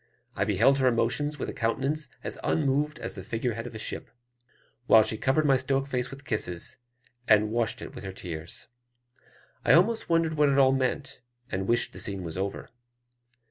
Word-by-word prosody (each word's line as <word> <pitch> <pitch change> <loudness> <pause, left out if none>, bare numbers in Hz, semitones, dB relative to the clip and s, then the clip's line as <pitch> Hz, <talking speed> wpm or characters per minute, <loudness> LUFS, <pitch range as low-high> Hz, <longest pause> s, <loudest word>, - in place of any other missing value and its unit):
I - - +1
beheld 115 +8 +3
her 130 - +3
emotions 125 +5 +1
with - - -4
a - - -4
countenance 135 +5 -1
as - - -5
unmoved 150 +1 +1
as - - -4
the 95 - -6
figure 115 +4 -2
head 115 +2 -5
of 120 - -10
a - - -3
ship; 110 - -6 0.8
while 110 -1 +8
she 110 0 -1
covered 135 +7 +1
my 135 -2 +5
stoic 135 +1 0
face 125 -2 -2
with 140 +2 -11
kisses, 90 -7 -2 0.5
and 105 0 +4
washed 115 0 -1
it - - -8
with - - -9
her 95 - -5
tears. 85 -3 -7 1.0
I 115 - +5
almost 215 +8 +3
wondered 165 -1 +2
what 150 -1 +4
it 140 - +2
all 135 -1 +6
meant, 135 +1 -1 0.3
and 95 0 -2
wished 120 +1 +1
the - - -9
scene 100 -2 -3
was 80 -2 -4
over. 95 +2 -4
125 Hz, 190 wpm, -28 LUFS, 110-140 Hz, 1.0 s, while